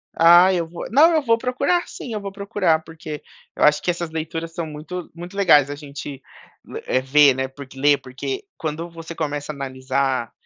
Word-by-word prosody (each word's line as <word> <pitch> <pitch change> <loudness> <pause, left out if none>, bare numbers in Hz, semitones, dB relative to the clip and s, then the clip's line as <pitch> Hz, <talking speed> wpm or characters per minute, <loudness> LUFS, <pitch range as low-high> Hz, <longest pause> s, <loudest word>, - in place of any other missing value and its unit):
Ah 175 +3 +7
eu 170 -2 0
vou, 170 +1 -7
não 305 +8 +6
eu 315 - +3
vou 230 -4 +2
procurar 255 +9 0
sim, 240 - -8
eu 215 - -2
vou 200 0 -6
procurar 195 -5 0
porque, 160 -2 -8 0.3
eu - - -1
acho 150 0 +5
que 175 - +1
essas 170 -1 -4
leituras 165 +1 -5
são 170 0 -3
muito 155 +4 -7
muito 175 +3 -9
legais 155 -8 +5
a 145 - -4
gente, 140 -1 -8 0.7
eh, 130 - +1
ver, 140 +1 +5
né, 130 0 -2
porque 135 0 -12
ler 145 +1 +4
porque 135 - -5
quando 160 +2 -4
você 165 0 -9
começa 150 -2 -3
analisar 130 -2 -2
160 Hz, 190 wpm, -22 LUFS, 145-180 Hz, 0.7 s, Ah